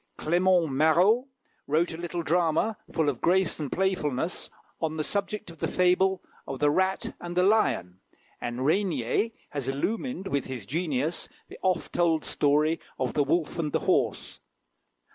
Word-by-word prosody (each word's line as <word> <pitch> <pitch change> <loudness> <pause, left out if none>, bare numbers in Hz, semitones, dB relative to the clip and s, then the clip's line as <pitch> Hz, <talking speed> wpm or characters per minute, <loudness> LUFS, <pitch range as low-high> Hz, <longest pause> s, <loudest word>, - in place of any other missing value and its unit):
Clément 175 +1 +3
Marot 170 - +3 0.4
wrote 160 +4 +1
a - - -6
little 170 0 -4
drama, 170 +6 +1 0.2
full 160 -3 +1
of 135 -5 -1
grace 185 -1 +2
and 145 -4 -4
playfulness, 180 -5 -1 0.3
on 160 -1 -1
the 155 - 0
subject 200 +1 -2
of 165 - -15
the - - 0
fable 185 +1 +2 0.2
of 135 - -4
"The 145 +2 +3
Rat 190 +4 0
and 175 0 -6
the 180 - +5
Lion;" 185 - +2 0.4
and 120 +1 -3
Régnier 165 - +1 0.2
has 140 -3 -4
illumined 200 - -2
with 140 -8 -1
his 125 -6 -6
genius 155 - -2 0.2
the - - -11
oft 185 -3 0
told 165 -2 +2
story 150 +3 +2 0.2
of 130 -1 -1
"The 145 - +2
Wolf 165 +3 0
and 150 -3 -1
the - - +1
Horse." - - 0
165 Hz, 160 wpm, -27 LUFS, 145-185 Hz, 0.4 s, the